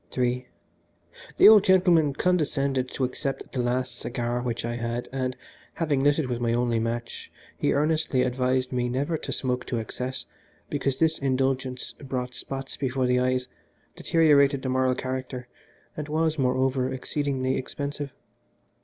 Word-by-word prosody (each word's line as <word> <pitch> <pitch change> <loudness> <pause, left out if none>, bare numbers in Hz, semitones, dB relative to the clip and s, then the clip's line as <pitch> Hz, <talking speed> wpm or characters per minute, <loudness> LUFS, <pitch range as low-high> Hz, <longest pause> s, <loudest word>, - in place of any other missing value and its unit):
III 125 0 0 0.9
The - - +9
old 215 -2 +9
gentleman 175 -6 +4
condescended 140 -7 +1
to 135 - -3
accept 135 +1 -3
the 125 - 0
last 125 +1 -1
cigar 120 0 -2
which 120 -2 -3
I 120 0 -2
had, 120 +1 -3
and, 130 -1 -2 0.4
having 150 -5 +1
lit 145 0 +4
it 155 -5 0
with 120 -2 -2
my 120 -1 +1
only 120 -1 +1
match, 115 +1 -4 0.2
he - - +1
earnestly 150 -3 +2
advised 130 0 0
me 125 -1 0
never 140 +6 -1
to - - -5
smoke 125 -1 -1
to 120 - -1
excess, 125 +3 -4 0.5
because 135 -2 0
this 160 +1 +2
indulgence 130 -1 -1
brought 130 -3 -4
spots 135 +2 -6
before 130 -1 0
the 125 0 +3
eyes, 125 0 +1 0.5
deteriorated 145 -4 +4
the 130 - -1
moral 130 0 +2
character, 130 -1 -4 0.5
and 150 -1 -5
was, 160 0 +1
moreover, 130 0 +1
exceedingly 130 0 -1
expensive. 140 +1 -4
130 Hz, 150 wpm, -26 LUFS, 125-140 Hz, 0.9 s, The